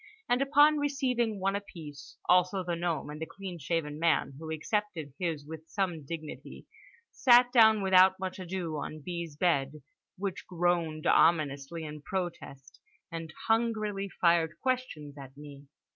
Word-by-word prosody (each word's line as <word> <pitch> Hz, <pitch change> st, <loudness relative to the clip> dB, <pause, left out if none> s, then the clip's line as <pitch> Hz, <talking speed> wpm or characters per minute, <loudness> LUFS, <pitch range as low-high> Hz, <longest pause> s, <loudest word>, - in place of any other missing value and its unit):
—and 245 Hz, +2 st, +2 dB
upon 295 Hz, +2 st, +5 dB
receiving 255 Hz, -7 st, 0 dB
one 195 Hz, +1 st, 0 dB
apiece 150 Hz, -, -9 dB
(also 180 Hz, +1 st, +3 dB
the 175 Hz, -1 st, -2 dB
gnome, 170 Hz, -3 st, -2 dB
and 150 Hz, +1 st, -8 dB
the 160 Hz, -, -3 dB
clean 190 Hz, -3 st, -8 dB
shaven 150 Hz, 0 st, -2 dB
man, 165 Hz, -4 st, +2 dB
who 160 Hz, 0 st, -7 dB
accepted 160 Hz, -3 st, -3 dB
his 165 Hz, -5 st, -2 dB
with 160 Hz, +1 st, -10 dB
some 180 Hz, -6 st, -2 dB
dignity) 155 Hz, +1 st, -8 dB, 0.5 s
sat 245 Hz, -1 st, +5 dB
down 220 Hz, -4 st, +6 dB
without 190 Hz, 0 st, +6 dB
much 190 Hz, 0 st, -5 dB
ado 175 Hz, -3 st, -4 dB
on 155 Hz, +2 st, -5 dB
B.'s 170 Hz, -1 st, -6 dB
bed—which 155 Hz, +4 st, -3 dB
groaned 170 Hz, -3 st, 0 dB
ominously 155 Hz, -1 st, +2 dB
in 150 Hz, 0 st, -8 dB
protest—and 165 Hz, -1 st, -7 dB, 0.2 s
hungrily 215 Hz, -3 st, 0 dB
fired 170 Hz, -3 st, +2 dB
questions 205 Hz, -, -3 dB
at 135 Hz, 0 st, -11 dB
me. 145 Hz, -1 st, -12 dB
170 Hz, 135 wpm, -30 LUFS, 155-200 Hz, 0.5 s, down